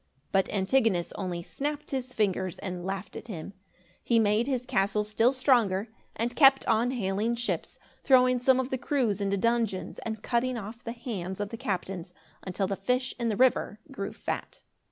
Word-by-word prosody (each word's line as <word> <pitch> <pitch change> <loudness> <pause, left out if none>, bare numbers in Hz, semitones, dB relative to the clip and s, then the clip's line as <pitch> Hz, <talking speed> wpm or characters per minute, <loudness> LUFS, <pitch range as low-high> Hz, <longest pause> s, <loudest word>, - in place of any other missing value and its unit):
But 195 -1 +2
Antigonus 200 -3 +2
only 180 -3 -4
snapped 295 - -4
his 260 -2 -3
fingers, 190 -5 0
and 180 -2 -5
laughed 190 +1 -4
at - - -8
him. 195 -2 -6 0.5
He 235 - +3
made 220 +2 +3
his 255 -3 -1
castle 200 +1 +1
still 220 +4 +3
stronger 235 -7 +2 0.3
and 235 +2 -2
kept 270 -3 +6
on 225 +2 +3
hailing 220 -1 0
ships, 240 0 -3 0.3
throwing 255 -1 +5
some 260 +1 +4
of 260 0 -2
the 260 - -1
crews 240 -9 0
into 200 0 +1
dungeons 230 -3 0
and 220 -2 -5
cutting 245 +1 0
off 225 +3 -8
the 230 - -4
hands 200 -7 -5
of 205 0 -2
the 230 - -5
captains, 185 -3 -4 0.3
until 195 +1 -2
the 195 +1 -1
fish 250 +6 0
in 235 -1 0
the 210 - -1
river 250 -4 +2
grew 200 -7 -4
fat. - - -5
220 Hz, 175 wpm, -28 LUFS, 195-250 Hz, 0.5 s, kept